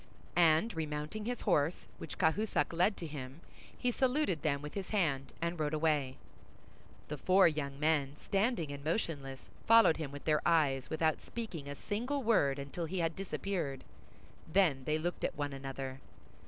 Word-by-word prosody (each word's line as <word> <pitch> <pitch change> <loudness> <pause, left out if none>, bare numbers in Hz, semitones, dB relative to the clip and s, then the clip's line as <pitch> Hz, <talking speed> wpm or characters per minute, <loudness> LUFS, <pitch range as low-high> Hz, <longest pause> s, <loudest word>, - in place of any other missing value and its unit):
And 170 +6 +4
remounting 155 +6 -3
his 245 +1 -3
horse, 165 -4 +1
which - - -7
Cahusac 190 +3 +1
led 180 +5 +2
to 170 - -5
him, 140 -1 -7 0.4
he 250 - +1
saluted 255 - +1
them 140 -2 0
with 150 - -6
his 195 -2 -5
hand, 145 -10 0
and 170 0 -2
rode 155 0 0
away. 150 -4 +1 0.9
The 150 -1 -5
four 185 +4 +5
young 140 -3 -2
men, 145 -3 +1
standing 200 - 0
and 140 0 -7
motionless, 145 - -3 0.2
followed 225 -7 +7
him 150 -4 -4
with 145 0 -9
their 155 -1 +3
eyes 145 -6 +2
without 160 -1 +1
speaking 185 -11 -6
a 145 - -5
single 245 - -2
word 145 -12 +3
until 140 +5 -4
he 185 +4 -4
had 165 -2 0
disappeared. 180 -8 -3 0.7
Then 155 -8 +3
they 155 0 +1
looked 175 +3 -3
at - - -1
one 145 -1 -2
another. 135 -1 -5
155 Hz, 165 wpm, -33 LUFS, 140-190 Hz, 0.9 s, followed